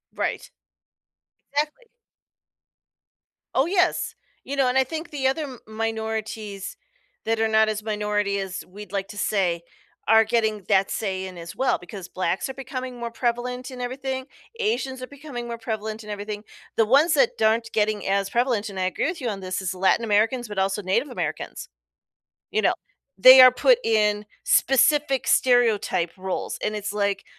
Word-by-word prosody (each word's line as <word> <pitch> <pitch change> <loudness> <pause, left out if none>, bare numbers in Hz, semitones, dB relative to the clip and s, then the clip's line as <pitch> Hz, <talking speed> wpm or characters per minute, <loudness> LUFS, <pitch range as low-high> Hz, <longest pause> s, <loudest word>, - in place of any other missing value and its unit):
Right. - - -2 1.0
Exactly. 300 +11 -1 1.7
Oh, 265 - +4
yes, 360 0 +1 0.3
you 280 - -4
know, 270 -2 +3
and 250 +1 +1
I 265 - +5
think 320 +5 -6
the 275 -3 -1
other 270 +4 0
m 260 -5 -8
minorities 220 - -4 0.5
that 225 0 0
are 225 - +3
not 220 0 +4
as 215 0 -3
minority 210 -2 -1
as 190 -1 -5
we'd 205 +3 -11
like 195 -1 -2
to 205 - -10
say 180 -5 0 0.4
are 225 0 +7
getting 220 -2 0
that 195 -1 +3
say 190 -3 -2
in 185 -1 -9
as 170 0 -8
well 265 - +1
because 180 0 -9
blacks 185 0 -2
are - - -4
becoming 255 -1 -6
more 235 -1 -4
prevalent 250 +2 -2
in 250 -1 -7
everything. 260 +1 -3 0.3
Asians 365 - -1
are 255 - -6
becoming 280 -4 -8
more 235 0 -5
prevalent 220 -1 -4
in 210 - -11
everything. 205 0 -5 0.3
The 225 - +5
ones 285 +8 +4
that 270 -5 +4
aren't 225 +1 +2
getting 215 -1 0
as 195 0 +1
prevalent, 235 -3 0
and 195 -1 -6
I 185 - +1
agree 185 - -1
with 335 -1 -4
you 245 - -1
on 200 -2 -4
this, 185 0 -3
is 190 -1 -2
Latin 190 +5 +2
Americans, 225 +4 +1
but 210 -1 -8
also 195 +2 0
Native 205 +9 0
Americans. 250 - -5 0.8
You 435 +1 0
know? - - +3 0.4
They 255 +6 +10
are 255 0 +9
put - - +4
in 210 -1 +2 0.2
specific 290 - +3
stereotype 225 -8 +3
roles, 190 0 -4
and 215 - -1
it's 210 -1 -3
like, 200 -1 -1
220 Hz, 170 wpm, -24 LUFS, 205-260 Hz, 1.7 s, They